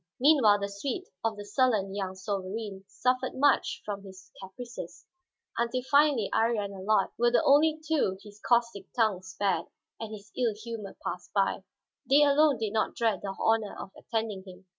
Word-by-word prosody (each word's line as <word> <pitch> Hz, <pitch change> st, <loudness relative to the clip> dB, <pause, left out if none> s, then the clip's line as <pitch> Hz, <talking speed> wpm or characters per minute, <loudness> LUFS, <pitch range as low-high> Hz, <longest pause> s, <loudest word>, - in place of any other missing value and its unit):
Meanwhile 250 Hz, -8 st, +5 dB
the 200 Hz, -, -1 dB
suite 270 Hz, -, -5 dB
of 225 Hz, -2 st, -1 dB
the 205 Hz, -, -7 dB
sullen 205 Hz, -3 st, +1 dB
young 190 Hz, -2 st, -3 dB
sovereign 195 Hz, +1 st, -4 dB
suffered 255 Hz, +1 st, -1 dB
much 285 Hz, +2 st, +2 dB
from 200 Hz, -1 st, -4 dB
his 190 Hz, 0 st, -13 dB
caprices; 190 Hz, -2 st, -9 dB, 0.5 s
until 235 Hz, +2 st, 0 dB
finally 285 Hz, -7 st, +4 dB
Iría 225 Hz, -2 st, +2 dB
and 200 Hz, -, -7 dB, 0.2 s
Allard 215 Hz, -3 st, +3 dB
were 240 Hz, 0 st, +4 dB
the 240 Hz, -, +3 dB
only 305 Hz, +3 st, +4 dB
two 280 Hz, -12 st, +1 dB
his 210 Hz, -1 st, -14 dB
caustic 235 Hz, -5 st, +1 dB
tongue 215 Hz, -6 st, +2 dB
spared 185 Hz, -2 st, -1 dB, 0.3 s
and 225 Hz, -1 st, -6 dB
his 210 Hz, -1 st, -10 dB
ill 235 Hz, -4 st, 0 dB
humor 220 Hz, -2 st, -7 dB
passed -, -, -5 dB
by. -, -, +1 dB, 0.5 s
They 285 Hz, +2 st, +6 dB
alone 290 Hz, -1 st, +4 dB
did 220 Hz, -2 st, -3 dB
not 220 Hz, -, 0 dB
dread 225 Hz, -3 st, 0 dB
the 195 Hz, -1 st, -5 dB
honor 225 Hz, -2 st, +1 dB
of 190 Hz, -, -8 dB
attending 220 Hz, -4 st, -3 dB
him. 185 Hz, 0 st, -13 dB
220 Hz, 170 wpm, -29 LUFS, 200-245 Hz, 0.5 s, They